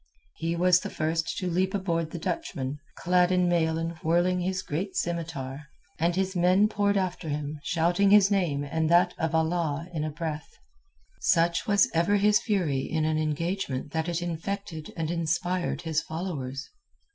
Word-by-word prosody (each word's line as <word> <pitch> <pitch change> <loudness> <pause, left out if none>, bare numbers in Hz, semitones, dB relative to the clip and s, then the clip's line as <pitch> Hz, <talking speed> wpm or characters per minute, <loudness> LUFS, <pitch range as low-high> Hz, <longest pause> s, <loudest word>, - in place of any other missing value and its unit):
He 165 +1 -2
was 180 +1 +4
the - - -5
first 160 +1 -1
to 185 - -2
leap 185 +3 0
aboard 165 -4 -1
the 170 - -6
Dutchman, 150 - -3 0.2
clad 180 0 +3
in 180 -1 +3
mail 160 -2 +2
and 165 0 -2
whirling 175 +3 +2
his 185 +1 -2
great 185 +6 -3
scimitar, 150 -5 -3 0.3
and 170 +2 +1
his 190 0 -1
men 180 +4 +4
poured 205 -1 +1
after 185 -3 -2
him 150 0 -3
shouting 175 +5 +2
his 205 0 +6
name 170 -8 +1
and 160 +2 -1
that 175 +1 +4
of 165 0 0
Allah 160 -1 0
in 155 -2 -2
a 155 - -1
breath. 155 0 -5 0.6
Such 170 +4 +2
was 200 -2 +4
ever 170 +5 +3
his 210 +1 +4
fury 180 - 0
in 155 +3 -1
an 155 0 +1
engagement 155 -2 -2
that 160 +2 -1
it 175 0 -2
infected 175 -1 -4
and 160 0 -1
inspired 175 +2 -1
his 160 -1 0
followers. 150 -6 -5
170 Hz, 170 wpm, -27 LUFS, 155-185 Hz, 0.6 s, his